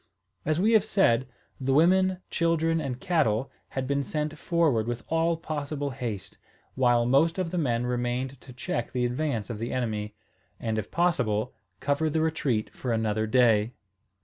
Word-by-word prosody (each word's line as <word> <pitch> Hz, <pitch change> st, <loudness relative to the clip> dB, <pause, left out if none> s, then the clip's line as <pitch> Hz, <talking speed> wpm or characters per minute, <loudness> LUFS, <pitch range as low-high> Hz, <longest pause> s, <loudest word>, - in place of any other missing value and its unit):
As 155 Hz, +2 st, +1 dB
we 215 Hz, +5 st, +3 dB
have 220 Hz, -3 st, +5 dB
said, 130 Hz, -, +2 dB, 0.3 s
the 135 Hz, 0 st, +1 dB
women, 185 Hz, +4 st, +4 dB
children, 165 Hz, -1 st, +1 dB
and 130 Hz, -4 st, -4 dB
cattle 135 Hz, -, +1 dB, 0.3 s
had 130 Hz, -, 0 dB
been 140 Hz, +1 st, 0 dB
sent 150 Hz, +2 st, -3 dB
forward 150 Hz, -9 st, +1 dB
with 120 Hz, 0 st, -3 dB
all 165 Hz, +1 st, +2 dB
possible 145 Hz, -3 st, -3 dB
haste, 115 Hz, -6 st, -5 dB, 0.3 s
while 120 Hz, -2 st, +3 dB
most 145 Hz, +8 st, +3 dB
of 180 Hz, -3 st, -1 dB
the 180 Hz, -, -1 dB
men 120 Hz, -5 st, 0 dB
remained 125 Hz, +2 st, -2 dB
to -, -, -12 dB
check 120 Hz, -1 st, -3 dB
the 125 Hz, -1 st, +1 dB
advance 125 Hz, -3 st, -2 dB
of 110 Hz, -, -5 dB
the 115 Hz, +2 st, -3 dB
enemy, 105 Hz, -4 st, -2 dB, 0.4 s
and, 110 Hz, -3 st, -1 dB
if 105 Hz, -, -5 dB
possible, 125 Hz, -12 st, +1 dB, 0.3 s
cover 145 Hz, +3 st, +1 dB
the 160 Hz, +1 st, 0 dB
retreat 145 Hz, -9 st, 0 dB
for 125 Hz, -, -4 dB
another 110 Hz, -1 st, 0 dB
day. 115 Hz, -2 st, +3 dB
130 Hz, 165 wpm, -27 LUFS, 120-160 Hz, 0.4 s, have